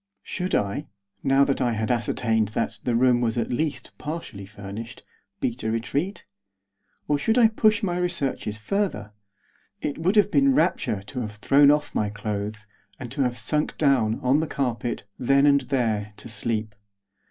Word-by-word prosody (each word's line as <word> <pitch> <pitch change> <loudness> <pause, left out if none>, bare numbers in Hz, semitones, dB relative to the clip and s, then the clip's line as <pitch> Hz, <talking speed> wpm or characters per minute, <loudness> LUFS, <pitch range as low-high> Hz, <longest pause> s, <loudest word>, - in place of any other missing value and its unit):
Should 185 0 -2
I, 105 +9 -1 0.4
now 135 0 +4
I 125 -3 +1
had 110 +1 -1
ascertained 115 -2 +1
that 115 - -1
the 120 - 0
room 125 0 +4
was, 115 -1 0
at 115 - -1
least, 140 0 -2
partially 150 - -6
furnished, 105 +3 -8 0.4
beat 120 +1 -2
a 110 - -1
retreat? 140 - -2 0.8
Or 145 -1 +1
should 225 - +1
I 230 -3 +7
push 215 -1 +2
my 175 -3 0
researches 145 -11 -2
further? 110 - -2 0.7
It 145 - -3
would 180 +6 +1
have 205 -1 +4
been 275 +1 +4
rapture 155 - +1
to 125 +6 -6
have 105 -2 -5
thrown 140 +6 +5
off 150 0 +2
my 105 - 0
clothes, 105 0 -4 0.3
and 125 -3 -7
to 140 - -2
have 125 -2 0
sunk 150 +3 -1
down, 125 -7 +2
on 130 +4 +3
the 160 - -1
carpet, 120 -4 -2 0.2
then 140 +3 +4
and 140 -1 +5
there, 110 -5 -1
to - - -9
sleep. 110 -1 -2
125 Hz, 165 wpm, -25 LUFS, 110-150 Hz, 0.8 s, I